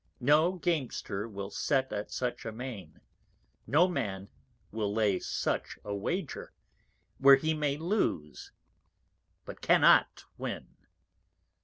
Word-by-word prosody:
No 150 +7 +4
Gamester 130 - -2
will 100 -1 -6
set 135 0 0
at 105 0 -4
such 125 -1 -3
a 115 - -4
Main; 110 -8 -8 0.7
no 155 +9 +4
Man 100 - -3 0.4
will 105 -2 -2
lay 105 -3 +1
such - - -2
a 105 - -3
Wager, 100 - -4 0.7
where 135 0 +9
he 155 +4 0
may 150 -2 -1
lose, 160 - -2 0.9
but - - -9
cannot - - +4
win. - - -6
125 Hz, 115 wpm, -30 LUFS, 100-150 Hz, 0.9 s, where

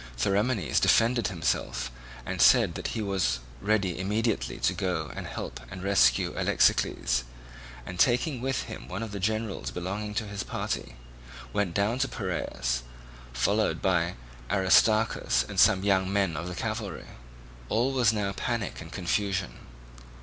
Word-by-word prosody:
Theramenes 100 - +1
defended 115 -1 +3
himself, 80 -8 -2 0.3
and - - -2
said - - +6
that - - -4
he 110 - -1
was 95 -12 0 0.2
ready 100 -4 +1
immediately 105 +3 -1
to - - +1
go - - -2
and - - -5
help - - -6
to - - -8
rescue 90 -11 +3
Alexicles; - - +2 0.6
and 90 -1 -7
taking 125 - +2
with 135 0 -1
him - - -8
one 95 +5 -4
of 110 - -6
the 100 - -5
generals 110 +1 -2
belonging 100 +4 -4
to 110 - -1
his 100 -1 -5
party, - - -4 0.6
went 90 -4 0
down 105 +5 +1
to 135 - +2
Piraeus, 85 - -2 0.5
followed 100 - +1
by 90 -2 +1 0.3
Aristarchus 110 +3 +3
and - - -3
some 95 -1 +5
young 95 -1 +2
men 100 -4 +1
of 85 +4 -4
the 90 - -5
cavalry. 110 -1 -4 0.6
All 120 +5 +2
was 125 -5 +3
now 105 -3 -1
panic 110 -1 -3
and 85 0 -10
confusion. 95 +1 -1
100 Hz, 145 wpm, -28 LUFS, 90-110 Hz, 0.6 s, said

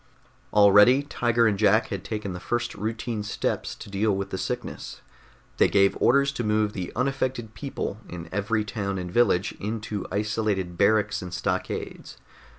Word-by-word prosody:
Already 105 +6 +6
Tiger 120 -4 +1
and 105 -3 +2
Jack 110 +1 +4
had - - -4
taken 105 -4 -4
the 90 - -6
first 120 +4 -2
routine 110 +2 -3
steps 105 0 -2
to - - -11
deal 100 +1 0
with 100 0 -4
the - - -2
sickness. 125 -1 -5 0.6
They - - +5
gave 100 -1 +3
orders 140 +3 +4
to 125 -3 -4
move 105 -1 +1
the 90 -3 -5
unaffected 130 -3 -1
people 125 -6 -5
in 85 -1 -7
every 105 +2 0
town 100 -1 -3
and 90 -1 -5
village 100 -4 +3
into 105 -1 -4
isolated 105 -4 -1
barracks 105 +3 +2
and 90 -1 -7
stockades. - - -4
105 Hz, 155 wpm, -26 LUFS, 100-120 Hz, 0.6 s, Already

